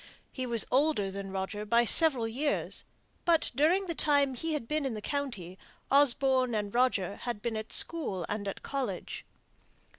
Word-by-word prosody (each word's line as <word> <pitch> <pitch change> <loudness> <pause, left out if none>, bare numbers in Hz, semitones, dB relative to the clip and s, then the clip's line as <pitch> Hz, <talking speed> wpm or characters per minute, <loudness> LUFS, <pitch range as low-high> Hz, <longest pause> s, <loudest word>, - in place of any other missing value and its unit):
He 255 -1 -5
was 235 -2 +3
older 255 -8 +1
than 195 0 -7
Roger 195 +2 -4
by 235 +3 +2
several 265 -4 +6
years; 280 +6 -3 0.4
but 335 -2 +1
during 340 +7 +2
the 340 - -3
time 285 -3 +1
he 325 +5 -4
had 285 -7 -4
been 305 +2 -1
in 265 -5 -3
the - - -5
county 210 -9 -5 0.3
Osborne 265 -3 +2
and 205 -1 -3
Roger 235 -6 0
had 240 -4 -5
been 235 -2 -2
at 220 0 -6
school 225 - +1
and 205 -1 -4
at 195 - -6
college. 275 -2 -5
250 Hz, 170 wpm, -29 LUFS, 210-285 Hz, 0.4 s, several